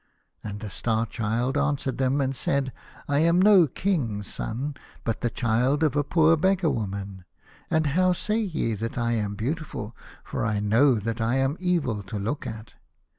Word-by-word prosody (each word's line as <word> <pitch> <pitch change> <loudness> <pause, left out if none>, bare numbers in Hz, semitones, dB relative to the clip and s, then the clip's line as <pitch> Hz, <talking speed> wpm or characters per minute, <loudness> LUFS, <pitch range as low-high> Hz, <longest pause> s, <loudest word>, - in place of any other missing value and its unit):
o 110 - -5
And 100 +1 -7
the 105 -3 -6
Star 115 +2 0
Child 115 +5 -1
answered 140 -2 -1
them 135 +2 +2
and 135 0 -1
said, 135 0 -1 0.2
" - - -21
I 140 0 +2
am 170 +3 +4
no 190 -4 +7
king's 125 - -1
son, 135 +6 -3 0.3
but 115 -2 -2
the 120 - +1
child 125 +6 +1
of 150 -3 +2
a 145 - +2
poor 160 +2 +4
beggar 185 0 +2
woman. 100 -3 -4 0.5
And 160 0 +2
how 180 +5 +3
say 210 +5 -1
ye 165 - -1
that 115 +3 -4
I 120 -1 0
am 105 -3 -1
beautiful, 120 -2 -4 0.3
for - - -4
I 105 -3 0
know 115 +6 +4
that 115 +2 -3
I 115 +3 +1
am 135 +2 +1
evil 155 - 0
to 100 +2 -6
look 110 +9 -3
at 110 0 -8
130 Hz, 185 wpm, -26 LUFS, 110-155 Hz, 0.5 s, no